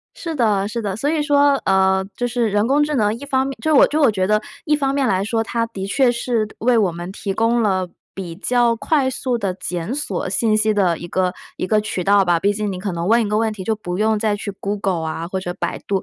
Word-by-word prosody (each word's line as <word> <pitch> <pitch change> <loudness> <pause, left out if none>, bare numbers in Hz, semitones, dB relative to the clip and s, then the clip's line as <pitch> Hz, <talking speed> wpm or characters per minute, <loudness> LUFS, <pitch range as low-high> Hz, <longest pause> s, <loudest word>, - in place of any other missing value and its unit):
是 330 -2 -5
的， 210 -6 +1
是 230 +2 -4
的。 200 -2 -2
所 285 +6 0
以 315 -2 +1
说， 285 -1 +4
呃， 190 0 +3
就 245 - -1
是 240 -2 0
人 205 +1 +1
工 280 +4 +3
智 300 0 0
能， 215 -5 +2
一 285 - -8
方 265 -1 0
面 275 - -5
就 315 -1 +2
我 - - +7
就 305 +2 -1
我 275 -6 +5
觉 190 -3 0
得 215 +1 +2 0.2
一 300 -2 +2
方 275 -2 0
面 275 -2 +1
来 190 +1 +1
说， 225 +1 0
它 230 +1 -1
的 195 -4 -6
确 245 +4 +2
是 235 -2 -1
为 245 +1 +2
我 200 -6 +2
们 175 +2 -7
提 200 0 -4
供 230 +3 +1
了 185 -3 0 0.3
比 175 -4 -6
较 240 +2 +2
快 275 +2 +1
速 255 -1 -2
地 195 -4 -2
检 180 +3 -4
索 240 -12 -3
信 215 +3 +1
息 215 0 +2
的 180 -5 +2
一 175 - -8
个 185 0 0 0.2
一 - - -3
个 215 +2 +2
渠 210 -4 -3
道 200 0 +4
吧。 175 -1 +2
毕 200 +4 +2
竟 210 0 -2
你 185 - -5
可 195 +1 -3
能 170 +2 -3
问 230 +1 +4
一 210 - -2
个 210 +1 +1
问 220 0 +1
题 195 -3 -7
就 220 - +1
不 180 -4 -5
用 220 0 +2
再 210 -1 0
去 205 - -5
Google 195 -5 -2
啊， 165 +1 -4
或 190 +1 -3
者 175 -1 -5
百 175 - -3
度， 200 - 0
呃， - - -2
215 Hz, 305 characters per minute, -20 LUFS, 190-245 Hz, 0.3 s, 我